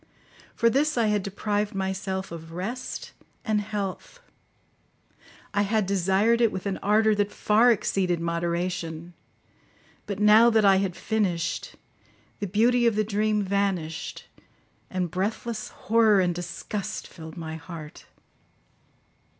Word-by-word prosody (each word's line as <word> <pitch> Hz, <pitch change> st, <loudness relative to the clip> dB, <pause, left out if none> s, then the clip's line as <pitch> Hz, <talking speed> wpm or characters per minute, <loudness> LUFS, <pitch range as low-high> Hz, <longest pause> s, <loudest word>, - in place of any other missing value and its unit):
For 230 Hz, -, +3 dB
this 280 Hz, +5 st, +2 dB
I 225 Hz, -2 st, +3 dB
had 210 Hz, -1 st, +1 dB
deprived 205 Hz, +1 st, -2 dB
myself 190 Hz, 0 st, -3 dB
of 165 Hz, -1 st, -9 dB
rest 235 Hz, +9 st, -5 dB, 0.3 s
and 215 Hz, -1 st, +1 dB
health. 205 Hz, -, -5 dB, 1.3 s
I 205 Hz, -, +2 dB
had 210 Hz, 0 st, +1 dB
desired 195 Hz, +5 st, +2 dB
it 230 Hz, -2 st, +4 dB
with 185 Hz, -, -5 dB
an 195 Hz, -1 st, -1 dB
ardour 215 Hz, +2 st, +3 dB
that 205 Hz, 0 st, 0 dB
far 225 Hz, +4 st, +4 dB
exceeded 185 Hz, -5 st, 0 dB
moderation; 170 Hz, 0 st, -3 dB, 0.9 s
but 200 Hz, -, -3 dB
now 215 Hz, +3 st, +7 dB
that 220 Hz, -2 st, +3 dB
I 195 Hz, -1 st, +6 dB
had 190 Hz, -2 st, -1 dB
finished, 185 Hz, -6 st, -1 dB, 0.6 s
the 205 Hz, -, -2 dB
beauty 235 Hz, +5 st, +3 dB
of 230 Hz, -, +2 dB
the 215 Hz, -, +2 dB
dream 210 Hz, 0 st, 0 dB
vanished, 190 Hz, -5 st, -2 dB, 0.6 s
and 180 Hz, -3 st, -2 dB
breathless 215 Hz, +3 st, -3 dB
horror 220 Hz, -2 st, +3 dB
and 180 Hz, -2 st, +2 dB
disgust 175 Hz, +3 st, -5 dB
filled 160 Hz, +1 st, -11 dB
my 160 Hz, -1 st, -5 dB
heart. 160 Hz, -2 st, -10 dB
200 Hz, 125 wpm, -26 LUFS, 180-215 Hz, 1.3 s, now